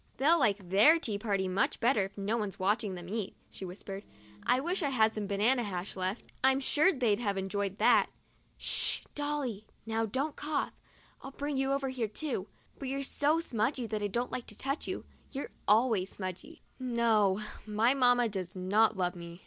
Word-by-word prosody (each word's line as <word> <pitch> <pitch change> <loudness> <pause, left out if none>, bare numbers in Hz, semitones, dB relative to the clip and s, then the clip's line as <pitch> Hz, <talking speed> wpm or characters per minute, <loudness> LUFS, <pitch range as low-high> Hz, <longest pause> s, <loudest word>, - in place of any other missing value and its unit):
" - - -35
They'll 320 +5 +5
like 205 -7 +1
their 210 - +6
tea 215 -11 -3
party 200 -3 0
much 185 +1 0
better 230 -3 +3
if 195 - -11
no 200 +3 0
one's 210 -4 -3
watching 205 +1 0
them 175 -1 -8
eat," 205 0 -3 0.2
she 190 - -7
whispered. 195 +2 -7 0.2
" 105 0 -22
I 250 +1 +3
wish 350 +7 -1
I 290 - +1
had 220 -4 +3
some 210 -2 -3
banana 215 +6 +3
hash 190 -3 -4
left; 185 +3 -3
I'm 265 0 +5
sure 300 +6 +4
they'd 240 - +1
have 200 -4 -1
enjoyed 195 +1 -2
that. - - +5 0.5
Sh, - - 0
Dolly! 290 -8 -3 0.2
Now 225 0 0
don't 275 +8 -2
cough. 295 -1 -2 0.5
I'd 270 +1 -10
bring 290 0 -2
you 270 0 +1
over 275 -1 0
here 250 -4 -1
too, 220 -3 -3 0.3
but 275 - -4
you're 275 +1 -2
so 290 +3 +2
smudgy 245 -3 -1
that 215 -1 -3
I 205 - +1
don't 240 +5 -2
like 255 -2 -4
to 210 - -10
touch 275 +2 -2
you. - - -4 0.2
You're 275 0 -5 0.2
always 215 -3 +3
smudgy." 190 - -7 0.2
No; 230 -6 +2 0.3
my 220 +4 +3
mamma 245 -3 +4
does 190 -3 -5
not 205 +4 +3
love 180 -1 0
me. 170 0 -9
220 Hz, 195 wpm, -31 LUFS, 195-265 Hz, 0.5 s, their